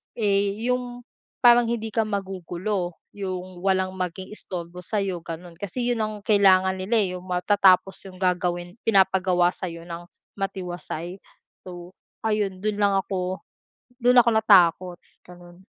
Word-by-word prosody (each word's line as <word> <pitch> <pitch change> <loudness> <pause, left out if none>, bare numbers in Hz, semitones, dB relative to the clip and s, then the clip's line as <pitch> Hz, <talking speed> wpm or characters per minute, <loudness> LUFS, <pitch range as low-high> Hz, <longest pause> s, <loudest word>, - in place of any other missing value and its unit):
eh, 200 -2 +1
yung 250 -1 -2 0.4
parang 240 -1 +6
hindi 230 -1 -2
ka 225 - +3
magugulo. 190 -2 -3 0.2
Yung 185 -2 -6
walang 190 -1 +1
maging 185 +1 -5
istorbo 175 -3 -7
sa'yo 195 -2 -2
gano'n 170 +1 -8
kasi, 205 +5 -4
'yon 235 - -1
ang 215 - -3
kailangan 190 -3 +5
nila, 190 +5 -2
eh, - - -1
yung - - -15
matatapos 190 +1 +3
yung 185 - -12
gagawin 175 -1 -1
pinapagawa 190 -3 +3
sa'yo 170 -3 -7
ng 170 0 -7 0.4
matiwasay. 180 -2 -5 0.5
So, 175 0 -9 0.3
ayun 210 -4 -1
do'n 215 -1 0
lang 200 -1 +3
ako, 185 -1 -3 0.6
do'n 245 +1 +4
ako 235 - +3
natakot, 185 -4 +4 0.3
gano'n. 175 +1 -15
190 Hz, 135 wpm, -24 LUFS, 180-205 Hz, 0.6 s, parang